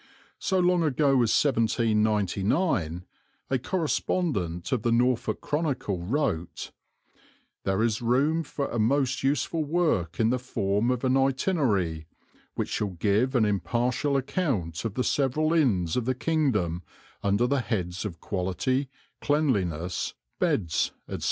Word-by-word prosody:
So 190 - 0
long 180 -1 +3
ago 150 -2 +2
as 115 - +2
1799 105 - +1 0.5
a 130 - +2
correspondent 135 - -1
of 130 -4 +1
the 120 - +1
Norfolk 115 -2 +1
Chronicle 145 - -1
wrote: 90 - -2 0.9
"There 95 +3 +1
is 115 -1 0
room 140 +7 +2
for 145 -2 -3
a 120 - -2
most 130 +3 +1
useful 145 +4 0
work 145 - 0
in 115 0 +3
the 125 - 0
form 110 -3 0
of 125 0 -1
an 130 0 +2
itinerary, 130 - +1 0.5
which - - -2
shall 105 - -1
give 110 +9 +1
an 115 -3 +4
impartial 120 +7 0
account 125 - -2
of 110 -2 -3
the 125 - 0
several 150 +5 +1
inns 100 - +2
of 125 - 0
the 130 +1 0
kingdom 115 - 0 0.4
under 100 +4 +2
the 135 +1 +1
heads 90 -7 -3
of 90 -6 -6
quality, 100 - -1 0.3
cleanliness, 95 - 0 0.2
beds," 85 -6 +1
etc. - - -5
120 Hz, 130 wpm, -27 LUFS, 100-140 Hz, 0.9 s, an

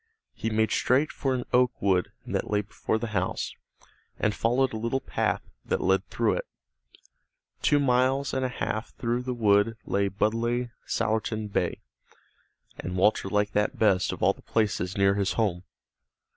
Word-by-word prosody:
He 115 - -3
made 110 -1 +1
straight 135 +5 +2
for 135 -2 -1
an 125 - -2
oak 125 0 +3
wood 95 -3 +1
that - - -2
lay 105 -1 +2
before 105 +1 -2
the 115 +1 -4
house, 90 -1 -1 0.6
and 105 - +1
followed 125 +4 +1
a - - -2
little 115 +4 -1
path - - -1 0.2
that - - -1
led 95 +1 +1
through - - +1
it. - - -5 1.1
Two 145 - +4
miles 130 +1 +2
and 130 - 0
a 130 - 0
half 110 -3 -4
through 120 +1 -1
the 125 0 -3
wood 110 0 +3
lay 100 0 +1
Budleigh 115 +4 0 0.2
Salterton 110 -1 -1
Bay, - - -1 1.0
and 90 +1 -4
Walter 95 +1 +3
liked 105 0 +1
that 105 0 +1
best 95 -5 +3
of - - -5
all - - +5
the - - -19
places 100 -4 -1
near 100 0 +4
his 100 -1 0
home. 95 -6 0
110 Hz, 165 wpm, -27 LUFS, 100-125 Hz, 1.1 s, all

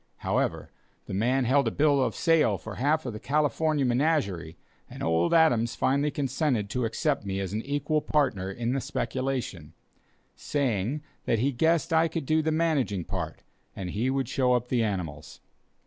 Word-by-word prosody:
However, - - -1 0.3
the - - -7
man 125 +6 +1
held 140 +3 +3
a - - +4
bill 145 -2 +3
of - - -1
sale 155 - +3
for 110 +1 -8
half 150 +4 +1
of 125 - -4
the 105 - -6
"California 150 +1 +1
Menagerie," 120 - 0 0.3
and - - -8
old 80 +1 +2
Adams 125 -9 +3
finally 140 +3 +1
consented 135 -6 -1
to 125 -2 0
accept 140 +5 -1
me 95 -1 -3
as 95 0 -4
an 110 - -1
equal 145 +3 -1
partner 130 -13 0
in 120 +5 -2
the 135 - -1
speculation, 120 - -3 0.6
saying 135 0 -1 0.2
that 115 - +2
he 130 +6 +1
guessed 165 +5 +1
I 160 +1 +4
could 165 -2 -4
do 155 +3 +2
the 160 0 0
managing 150 - 0
part, 85 -3 -5 0.3
and 90 -2 -5
he 115 +7 0
would 135 -2 0
show 125 0 +2
up 125 0 0
the 120 -3 +2
animals. 90 -9 -4
130 Hz, 175 wpm, -27 LUFS, 105-150 Hz, 0.6 s, a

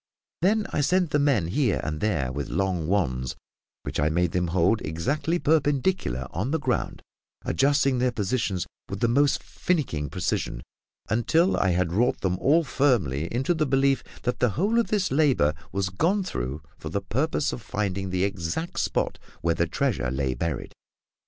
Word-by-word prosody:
Then 210 +4 +3
I - - +1
sent 180 +2 +2
men 140 - +2
here 120 +1 +1
and 75 -1 -3
there 80 -12 0
with 70 +1 -4
long 90 -3 -1
wands, 65 -10 0 0.5
which - - -3
I 75 +1 +3
made 85 +1 +1
them 90 0 0
hold 90 +6 +2
exactly 140 - -1
perpendicular 145 - +1
on 100 +9 -2
the 160 +2 0
ground, 130 -4 -2 0.4
adjusting 135 - +2
their 125 0 +2
positions 105 -4 -1 0.2
with 100 - -4
the 120 - +2
most 140 +4 +2
finicking 120 - -1
precision, - - -2 0.4
until 160 - +2
I 95 - +2
had 85 -1 0
wrought 120 +6 +2
them 90 -1 0
all 160 - +4
firmly 100 - +1
into 130 +8 +1
the 155 -3 0
belief 135 0 +2 0.2
that 125 - -1
the 125 - +3
whole 210 +7 +2
of 235 - +1
this 200 -3 0
labour 135 - +3 0.2
was 95 -1 -1
gone 175 - +1
through 75 - -4 0.2
for 80 - -6
the 100 +5 -2
purpose 140 +9 0
of 120 - -6
finding 100 -2 -2
the 90 0 0
exact 100 - -2
spot - - -1 0.2
where 85 0 +2
the 85 +1 0
treasure 110 - 0
lay 65 0 -1
buried. 80 -1 -3
105 Hz, 170 wpm, -26 LUFS, -, 0.5 s, all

